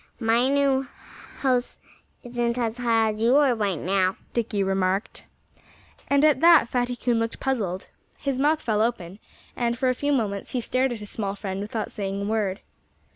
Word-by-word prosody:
"My 235 Hz, +2 st, +2 dB
new 275 Hz, -1 st, +2 dB, 0.5 s
house 255 Hz, -2 st, 0 dB, 0.5 s
isn't 240 Hz, -1 st, -2 dB
as 230 Hz, -1 st, -1 dB
high 225 Hz, -2 st, +2 dB
as 215 Hz, +1 st, -7 dB
you 235 Hz, +3 st, +4 dB
are 285 Hz, -3 st, +5 dB
right 205 Hz, -6 st, -1 dB
now," 185 Hz, +2 st, +1 dB, 0.2 s
Dickie 215 Hz, -4 st, 0 dB
remarked. 190 Hz, +1 st, -1 dB, 0.8 s
And 280 Hz, +1 st, +3 dB
at 305 Hz, -2 st, +4 dB
that 335 Hz, -6 st, +6 dB
Fatty 245 Hz, 0 st, -1 dB
Coon 240 Hz, -1 st, 0 dB
looked 230 Hz, 0 st, -2 dB
puzzled. 205 Hz, -9 st, -2 dB, 0.3 s
His 275 Hz, -2 st, -2 dB
mouth 305 Hz, +3 st, +2 dB
fell 215 Hz, -3 st, +1 dB
open; 205 Hz, -5 st, -2 dB, 0.4 s
and 235 Hz, -1 st, -1 dB
for 260 Hz, 0 st, +1 dB
a -, -, +2 dB
few 285 Hz, +3 st, -1 dB
moments 210 Hz, -7 st, -1 dB
he 255 Hz, -, 0 dB
stared 255 Hz, +2 st, 0 dB
at 230 Hz, -3 st, -5 dB
his 205 Hz, -, -7 dB
small 200 Hz, -2 st, -3 dB
friend 195 Hz, -1 st, -5 dB
without 215 Hz, +1 st, -4 dB
saying 195 Hz, -1 st, -3 dB
a 200 Hz, -, -3 dB
word. 210 Hz, -2 st, -1 dB
230 Hz, 180 wpm, -25 LUFS, 205-255 Hz, 0.8 s, that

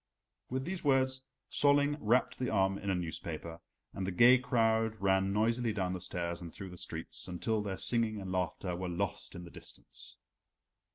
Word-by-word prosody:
With 130 Hz, +1 st, -2 dB
these 185 Hz, 0 st, -4 dB
words 130 Hz, -2 st, +3 dB, 0.3 s
Solling 145 Hz, 0 st, +4 dB
wrapped 120 Hz, +2 st, +2 dB
the 125 Hz, -, 0 dB
arm 95 Hz, -2 st, +2 dB
in 100 Hz, -, -4 dB
a 95 Hz, -, +2 dB
newspaper, 85 Hz, -1 st, -5 dB, 0.3 s
and 95 Hz, -1 st, -3 dB
the -, -, -1 dB
gay 120 Hz, +7 st, +7 dB
crowd 115 Hz, -3 st, +2 dB
ran 95 Hz, 0 st, +2 dB
noisily 115 Hz, +2 st, +1 dB
down 95 Hz, -3 st, -1 dB
the 90 Hz, -, -5 dB
stairs 85 Hz, -1 st, -3 dB
and 85 Hz, -2 st, -7 dB
through 95 Hz, +2 st, -8 dB
the -, -, -9 dB
streets, -, -, -4 dB
until 100 Hz, +5 st, -1 dB
their 100 Hz, -2 st, -3 dB
singing 115 Hz, -3 st, +2 dB
and 95 Hz, -2 st, -5 dB
laughter 90 Hz, 0 st, -1 dB
were 90 Hz, 0 st, -3 dB
lost 85 Hz, -, -3 dB
in 90 Hz, -, -7 dB
the 85 Hz, -, -11 dB
distance. -, -, -8 dB
100 Hz, 180 wpm, -33 LUFS, 90-120 Hz, 0.3 s, gay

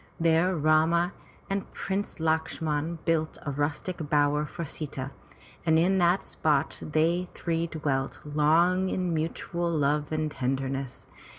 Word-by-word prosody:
There 165 Hz, +3 st, +3 dB
Rama 160 Hz, +3 st, +3 dB, 0.3 s
and 195 Hz, -1 st, -3 dB
Prince 195 Hz, +1 st, -2 dB
Lakshman 160 Hz, 0 st, -1 dB
built 160 Hz, -2 st, +1 dB
a 145 Hz, -, -1 dB
rustic 145 Hz, +3 st, -2 dB
bower 150 Hz, 0 st, +2 dB
for 170 Hz, +1 st, -5 dB
Sita, 140 Hz, -3 st, -5 dB, 0.5 s
and 160 Hz, -1 st, +4 dB
in 190 Hz, +4 st, +3 dB
that 175 Hz, +2 st, +3 dB
spot 155 Hz, -2 st, 0 dB
they 165 Hz, +4 st, +1 dB
three 165 Hz, 0 st, -1 dB
dwelt 145 Hz, -4 st, -2 dB
long 165 Hz, +5 st, +3 dB
in 180 Hz, -2 st, -1 dB
mutual 170 Hz, +2 st, -2 dB
love 150 Hz, -1 st, +1 dB
and 155 Hz, -1 st, -1 dB
tenderness. 135 Hz, 0 st, -3 dB
160 Hz, 125 wpm, -28 LUFS, 150-170 Hz, 0.5 s, and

